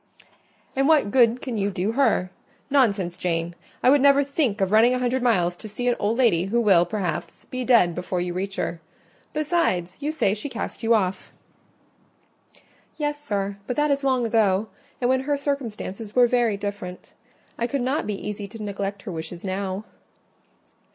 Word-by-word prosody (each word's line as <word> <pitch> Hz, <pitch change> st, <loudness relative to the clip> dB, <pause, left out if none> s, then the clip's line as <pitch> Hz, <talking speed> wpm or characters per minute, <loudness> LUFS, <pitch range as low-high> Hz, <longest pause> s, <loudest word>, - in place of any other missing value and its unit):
"And 270 Hz, +1 st, +2 dB
what 300 Hz, -10 st, +4 dB
good 240 Hz, 0 st, +4 dB
can 250 Hz, -5 st, -3 dB
you 200 Hz, 0 st, +1 dB
do 195 Hz, +2 st, -1 dB
her? 225 Hz, -8 st, +2 dB, 0.4 s
Nonsense, 200 Hz, -10 st, +2 dB
Jane! 170 Hz, -1 st, -1 dB, 0.3 s
I 255 Hz, -, +6 dB
would 285 Hz, -1 st, +5 dB
never 280 Hz, 0 st, +6 dB
think 275 Hz, -6 st, 0 dB
of 195 Hz, -1 st, +1 dB
running 230 Hz, +4 st, +5 dB
a -, -, 0 dB
hundred 250 Hz, +1 st, 0 dB
miles 180 Hz, -8 st, +2 dB
to 215 Hz, -, -9 dB
see 245 Hz, +4 st, -3 dB
an 245 Hz, -, +3 dB
old 215 Hz, +3 st, 0 dB
lady 205 Hz, -9 st, +3 dB
who 225 Hz, +5 st, +1 dB
will, 190 Hz, -6 st, +4 dB
perhaps, 185 Hz, -7 st, -4 dB
be 255 Hz, 0 st, -4 dB
dead 230 Hz, -9 st, +4 dB
before 180 Hz, +1 st, -3 dB
you 175 Hz, 0 st, -2 dB
reach 195 Hz, +2 st, -3 dB
her: 170 Hz, -4 st, -3 dB, 0.5 s
besides, 295 Hz, -, 0 dB
you 295 Hz, +2 st, -2 dB
say 255 Hz, -11 st, +1 dB
she 215 Hz, +7 st, -5 dB
cast 235 Hz, -, -5 dB
you 230 Hz, 0 st, +4 dB
off." 190 Hz, -3 st, -1 dB, 1.7 s
"Yes, 295 Hz, -1 st, -2 dB
sir, 200 Hz, -5 st, -2 dB
but 250 Hz, -, -2 dB
that 295 Hz, 0 st, +2 dB
is 280 Hz, 0 st, 0 dB
long 260 Hz, -3 st, +2 dB
ago; 215 Hz, -2 st, +2 dB, 0.3 s
and 245 Hz, -, +1 dB
when 260 Hz, +1 st, +3 dB
her 285 Hz, +2 st, -1 dB
circumstances 230 Hz, -7 st, -4 dB
were 250 Hz, -1 st, +7 dB
very 240 Hz, -4 st, +2 dB
different: 200 Hz, -3 st, -6 dB, 0.5 s
I 235 Hz, -, +1 dB
could 280 Hz, +3 st, -2 dB
not 265 Hz, +5 st, -1 dB
be 210 Hz, -, -1 dB
easy 205 Hz, -1 st, -5 dB
to 215 Hz, +2 st, -9 dB
neglect 200 Hz, -1 st, -4 dB
her 205 Hz, -, -6 dB
wishes 170 Hz, +2 st, -7 dB
now." 190 Hz, +1 st, -3 dB
220 Hz, 180 wpm, -24 LUFS, 195-255 Hz, 1.7 s, were